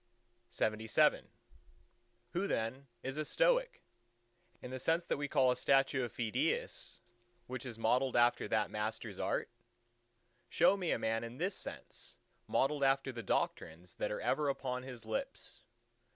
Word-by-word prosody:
LXXVIII 110 Hz, 0 st, +2 dB, 1.0 s
Who 180 Hz, +4 st, 0 dB
then 130 Hz, +2 st, -2 dB, 0.2 s
is 135 Hz, +2 st, -3 dB
a 155 Hz, -, 0 dB
Stoic—in 140 Hz, -, -2 dB
the 130 Hz, -, -4 dB
sense 165 Hz, +6 st, +1 dB
that -, -, -1 dB
we 145 Hz, 0 st, -2 dB
call 130 Hz, -2 st, +4 dB
a -, -, +1 dB
statue 135 Hz, -1 st, +3 dB
of 120 Hz, -, -3 dB
Phidias 115 Hz, -3 st, -2 dB, 0.4 s
which 130 Hz, 0 st, -5 dB
is 115 Hz, -3 st, -6 dB
modelled 125 Hz, +3 st, +2 dB
after 120 Hz, -2 st, +4 dB
that 105 Hz, +1 st, +1 dB
master's 105 Hz, +1 st, -3 dB
art? -, -, 0 dB, 1.0 s
Show -, -, +5 dB
me 185 Hz, -4 st, -2 dB
a -, -, +2 dB
man 115 Hz, +1 st, 0 dB
in 115 Hz, +2 st, -7 dB
this 185 Hz, +6 st, 0 dB
sense -, -, -8 dB, 0.3 s
modelled 140 Hz, +1 st, +1 dB
after 135 Hz, 0 st, +3 dB
the 120 Hz, -2 st, -6 dB
doctrines 85 Hz, -3 st, -2 dB
that -, -, -1 dB
are 105 Hz, -, -3 dB
ever 150 Hz, -2 st, +1 dB
upon 125 Hz, -2 st, -2 dB
his 125 Hz, -3 st, -8 dB
lips. 110 Hz, -1 st, -5 dB
125 Hz, 145 wpm, -35 LUFS, 115-140 Hz, 1.0 s, Show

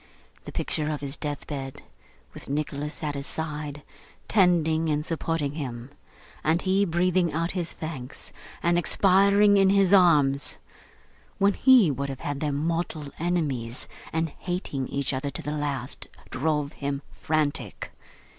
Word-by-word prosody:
The -, -, -7 dB
picture 155 Hz, -1 st, -1 dB
of 150 Hz, -3 st, -3 dB
his 140 Hz, 0 st, -1 dB
deathbed, 145 Hz, -2 st, -5 dB, 0.5 s
with -, -, -10 dB
Nicholas 150 Hz, +1 st, -3 dB
at 150 Hz, -1 st, -1 dB
his 140 Hz, 0 st, -5 dB
side, 150 Hz, -2 st, -4 dB, 0.4 s
tending 165 Hz, -5 st, +3 dB
and 150 Hz, 0 st, 0 dB
supporting 165 Hz, -3 st, -1 dB
him, 130 Hz, -4 st, -6 dB, 0.5 s
and 160 Hz, +2 st, +3 dB
he 195 Hz, +1 st, +3 dB
breathing 175 Hz, 0 st, +2 dB
out 165 Hz, +2 st, 0 dB
his 175 Hz, -3 st, -3 dB
thanks, 145 Hz, -5 st, -6 dB, 0.3 s
and 175 Hz, 0 st, +3 dB
expiring 200 Hz, +3 st, +5 dB
in 195 Hz, -1 st, +5 dB
his 195 Hz, -1 st, +4 dB
arms, 150 Hz, -7 st, +4 dB, 0.8 s
when 200 Hz, 0 st, +4 dB
he 250 Hz, -, +6 dB
would 140 Hz, +1 st, -3 dB
have 135 Hz, -1 st, -6 dB
had 145 Hz, -1 st, -3 dB
them 145 Hz, -2 st, -1 dB
mortal 160 Hz, -1 st, -2 dB
enemies 145 Hz, -9 st, -1 dB, 0.2 s
and 165 Hz, 0 st, 0 dB
hating 175 Hz, -7 st, -3 dB
each 140 Hz, 0 st, -1 dB
other 135 Hz, +2 st, -2 dB
to -, -, -6 dB
the 150 Hz, -, -3 dB
last, 145 Hz, -4 st, -3 dB, 0.2 s
drove 150 Hz, +1 st, 0 dB
him 140 Hz, 0 st, -3 dB
frantic. 145 Hz, -9 st, -2 dB
155 Hz, 140 wpm, -26 LUFS, 140-175 Hz, 0.8 s, he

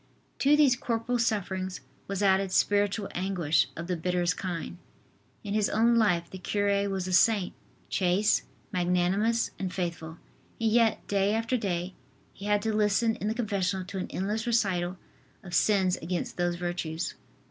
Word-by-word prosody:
To 290 Hz, +2 st, +4 dB
these 280 Hz, -5 st, +5 dB
corporal 240 Hz, 0 st, -1 dB
sufferings 190 Hz, -4 st, -1 dB, 0.3 s
was 200 Hz, 0 st, -2 dB
added 195 Hz, -1 st, +3 dB
spiritual 205 Hz, +1 st, +2 dB
anguish 175 Hz, -6 st, +1 dB
of 165 Hz, -, -4 dB
the 180 Hz, 0 st, -1 dB
bitterest 180 Hz, +1 st, 0 dB
kind. 170 Hz, -, -5 dB, 0.6 s
In 205 Hz, -, -4 dB
his 215 Hz, -1 st, +2 dB
own 230 Hz, +2 st, +3 dB
life 190 Hz, -7 st, +2 dB
the 190 Hz, -, -9 dB
cure 200 Hz, +1 st, 0 dB
was 190 Hz, -2 st, -2 dB
a 185 Hz, -, -2 dB
saint, 200 Hz, 0 st, +3 dB, 0.3 s
chaste, 190 Hz, +3 st, +2 dB, 0.3 s
magnanimous 185 Hz, +5 st, +1 dB
and 185 Hz, -2 st, -3 dB
faithful, 170 Hz, -3 st, -4 dB, 0.4 s
and 225 Hz, -1 st, +1 dB
yet, 230 Hz, -1 st, +2 dB
day 200 Hz, +1 st, +1 dB
after 225 Hz, +3 st, 0 dB
day, 185 Hz, -5 st, -2 dB, 0.4 s
he 200 Hz, -, -10 dB
had 205 Hz, 0 st, +1 dB
to 220 Hz, -1 st, 0 dB
listen 215 Hz, +2 st, +2 dB
in 210 Hz, -, -3 dB
the 220 Hz, -, -1 dB
confessional 195 Hz, -5 st, -1 dB
to 195 Hz, +1 st, -5 dB
an -, -, -3 dB
endless 210 Hz, +4 st, -2 dB
recital 190 Hz, -6 st, +1 dB, 0.5 s
of 175 Hz, -2 st, -10 dB
sins 190 Hz, 0 st, +3 dB
against 175 Hz, +1 st, -4 dB
those 175 Hz, -1 st, 0 dB
virtues. 175 Hz, -1 st, -3 dB
195 Hz, 160 wpm, -28 LUFS, 180-215 Hz, 0.6 s, these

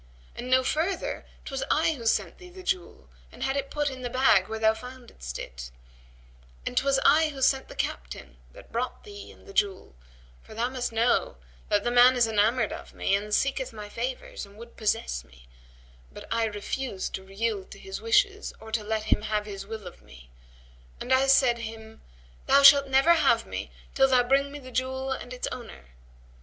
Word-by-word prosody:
And 250 Hz, -, -6 dB
know 260 Hz, 0 st, +4 dB
further 330 Hz, +8 st, -2 dB, 0.2 s
'twas 270 Hz, -2 st, -4 dB
I 320 Hz, +1 st, +3 dB
who 235 Hz, -6 st, -5 dB
sent -, -, 0 dB
thee 360 Hz, 0 st, -12 dB
the 370 Hz, +1 st, -12 dB
jewel 120 Hz, -, -3 dB, 0.2 s
and -, -, -8 dB
had 270 Hz, -, 0 dB
it 275 Hz, -1 st, -2 dB
put 295 Hz, -1 st, -1 dB
in 260 Hz, -1 st, -8 dB
the 245 Hz, -, -3 dB
bag 240 Hz, -7 st, +4 dB
where 220 Hz, -, -4 dB
thou 220 Hz, 0 st, +3 dB
foundest 235 Hz, -, -9 dB
it, -, -, -8 dB, 1.0 s
and -, -, -3 dB
'twas 275 Hz, 0 st, +3 dB
I 310 Hz, +2 st, +5 dB
who 280 Hz, -2 st, -8 dB
sent 265 Hz, 0 st, +2 dB
the -, -, -11 dB
captain 60 Hz, +2 st, -5 dB
that -, -, -15 dB
brought 245 Hz, +2 st, -3 dB
thee 410 Hz, -1 st, -10 dB
and -, -, -18 dB
the 400 Hz, -, -12 dB
jewel; 195 Hz, -, -1 dB, 0.5 s
for -, -, -14 dB
thou 235 Hz, +2 st, 0 dB
must 250 Hz, -2 st, -3 dB
know 225 Hz, -, +1 dB, 0.3 s
that 205 Hz, -1 st, +2 dB
the 240 Hz, -, 0 dB
man 245 Hz, +1 st, +7 dB
is 245 Hz, -2 st, +4 dB
enamoured 220 Hz, +1 st, +2 dB
of -, -, -10 dB
me -, -, 0 dB
and 205 Hz, +2 st, 0 dB
seeketh 265 Hz, +3 st, 0 dB
my 210 Hz, -1 st, -8 dB
favours 250 Hz, +4 st, -5 dB
and 200 Hz, +1 st, -13 dB
would 235 Hz, +1 st, -12 dB
possess 215 Hz, -, -1 dB
me; -, -, -20 dB, 0.6 s
but -, -, -11 dB
I 230 Hz, 0 st, +1 dB
refused 210 Hz, +1 st, -4 dB
to 190 Hz, 0 st, -7 dB
yield 210 Hz, -1 st, -2 dB
to -, -, -11 dB
his 385 Hz, 0 st, -7 dB
wishes 415 Hz, -2 st, +2 dB
or 220 Hz, 0 st, -11 dB
let 220 Hz, -1 st, -1 dB
him 215 Hz, -, +2 dB
have 210 Hz, -1 st, -1 dB
his 195 Hz, -1 st, -7 dB
will 220 Hz, -2 st, -7 dB
of 180 Hz, -, -11 dB
me; -, -, -16 dB, 0.7 s
and 255 Hz, -, 0 dB
I 265 Hz, +1 st, +4 dB
said 260 Hz, -3 st, +4 dB
him, 220 Hz, -1 st, -9 dB, 0.5 s
'Thou 280 Hz, -, +5 dB
shalt 280 Hz, 0 st, +9 dB
never 270 Hz, +5 st, +5 dB
have 330 Hz, -, +3 dB
me -, -, -5 dB, 0.2 s
till 270 Hz, -1 st, +4 dB
thou 255 Hz, -2 st, +4 dB
bring 275 Hz, +3 st, +2 dB
me 290 Hz, -, -7 dB
the 255 Hz, -2 st, -11 dB
jewel 260 Hz, +1 st, -2 dB
and 260 Hz, -1 st, -5 dB
its 255 Hz, -, -4 dB
owner.' 65 Hz, -, -9 dB
240 Hz, 200 wpm, -27 LUFS, 210-270 Hz, 1.0 s, shalt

